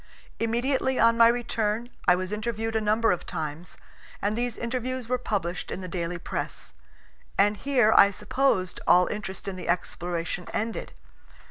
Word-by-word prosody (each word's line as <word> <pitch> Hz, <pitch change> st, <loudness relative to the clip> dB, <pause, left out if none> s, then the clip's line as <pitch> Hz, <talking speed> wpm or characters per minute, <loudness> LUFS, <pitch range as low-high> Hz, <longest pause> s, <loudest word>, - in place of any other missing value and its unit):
Immediately 255 Hz, +3 st, 0 dB
on 230 Hz, 0 st, +5 dB
my 230 Hz, 0 st, +7 dB
return 230 Hz, -1 st, 0 dB, 0.2 s
I 180 Hz, -, +7 dB
was 185 Hz, +1 st, -4 dB
interviewed 225 Hz, +1 st, -2 dB
a 220 Hz, -, +2 dB
number 215 Hz, +2 st, +3 dB
of 180 Hz, -, -1 dB
times, 155 Hz, +2 st, -5 dB, 0.4 s
and 205 Hz, +1 st, 0 dB
these 240 Hz, 0 st, -2 dB
interviews 250 Hz, +1 st, -3 dB
were 250 Hz, +1 st, 0 dB
published 185 Hz, -7 st, -2 dB
in -, -, -4 dB
the 185 Hz, -, -6 dB
daily 175 Hz, -1 st, -3 dB
press; 170 Hz, -, -5 dB, 0.6 s
and 205 Hz, +1 st, +4 dB
here 240 Hz, 0 st, +3 dB
I 200 Hz, -, +8 dB
supposed 205 Hz, -2 st, 0 dB
all 180 Hz, 0 st, +6 dB
interest 200 Hz, -2 st, -5 dB
in 190 Hz, -1 st, -4 dB
the 180 Hz, -, -6 dB
exploration 175 Hz, 0 st, -2 dB
ended. 225 Hz, +1 st, -3 dB
215 Hz, 155 wpm, -27 LUFS, 185-235 Hz, 0.6 s, I